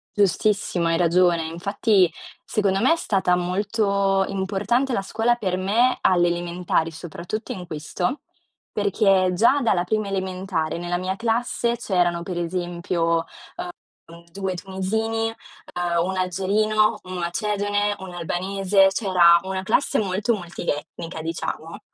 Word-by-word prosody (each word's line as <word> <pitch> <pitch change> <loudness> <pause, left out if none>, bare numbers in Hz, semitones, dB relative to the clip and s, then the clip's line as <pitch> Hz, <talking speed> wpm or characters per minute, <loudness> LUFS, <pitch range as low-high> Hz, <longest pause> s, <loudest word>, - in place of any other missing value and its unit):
Giustissimo, 200 -2 +1
hai 165 0 +2
ragione. 175 -1 +3
Infatti, 195 +2 +2 0.3
secondo 195 -2 0
me 260 - +4
è - - +2
stata 190 - +1
molto 195 +1 +1
importante 200 +7 0
la 235 - 0
scuola 225 +4 +1
per 190 -6 -2
me 215 +7 +2
alle 175 -2 +4
elementari, 175 -1 -1
soprattutto 175 +6 -6
in 180 -2 -7
questo, 175 - -3 0.5
perché 195 -2 +3
già 235 +10 +4
dalla 190 -7 +2
prima 215 +1 -1
elementare, 185 -4 -2
nella 175 +1 -2
mia 185 +1 -2
classe 235 +2 0
c'erano 175 -6 0
per 180 0 -5
esempio, 170 -1 -1 0.8
ehm, 170 +1 -14
2 190 +1 -3
tunisini, 215 +5 -2
ehm 225 - -6 0.7
1 190 +1 -1
algerino, 210 +4 +1
1 185 0 -8
macedone, 205 +3 -1
1 190 -1 -8
albanese, 195 +3 +2
cioè 200 0 -2
era 170 -2 +6
una 190 0 -4
classe 230 +8 +1
molto 205 +3 0
multietnica 165 -2 -5
diciamo. 165 0 -5
190 Hz, 130 wpm, -23 LUFS, 175-210 Hz, 0.8 s, era